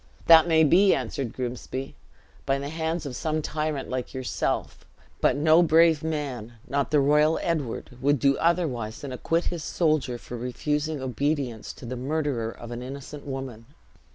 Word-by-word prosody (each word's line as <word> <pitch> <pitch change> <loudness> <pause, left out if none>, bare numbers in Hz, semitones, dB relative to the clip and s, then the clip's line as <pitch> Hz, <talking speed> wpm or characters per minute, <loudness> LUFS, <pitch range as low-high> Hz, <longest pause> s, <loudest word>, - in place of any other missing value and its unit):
"That 165 0 +8
may 160 -1 +5
be," 185 +6 +5
answered 130 -5 -3
Grimsby, 130 +1 -5 0.5
"by 135 0 +2
the 140 +1 -5
hands 160 +1 -2
of 135 -3 -5
some 155 +2 -1
tyrant 150 -3 -2
like 130 +1 -4
yourself; 130 -1 -2 0.4
but - - +3
no 155 +3 +5
brave 165 -2 +4
man, 140 -8 -3
not 140 0 0
the 150 - +3
royal 150 +3 +4
Edward, 150 -10 -2
would 145 +1 +3
do 140 +1 +3
otherwise 135 -11 0
than 140 - -6
acquit 165 +6 0
his 165 -3 -5
soldier 155 -8 0
for 120 - -9
refusing 150 +5 -2
obedience 130 -3 -2
to - - -12
the 125 +2 -4
murderer 135 -3 -1
of 120 +1 -10
an 120 0 -5
innocent 140 +3 -8
woman. 130 -4 -6
145 Hz, 160 wpm, -26 LUFS, 125-155 Hz, 0.5 s, That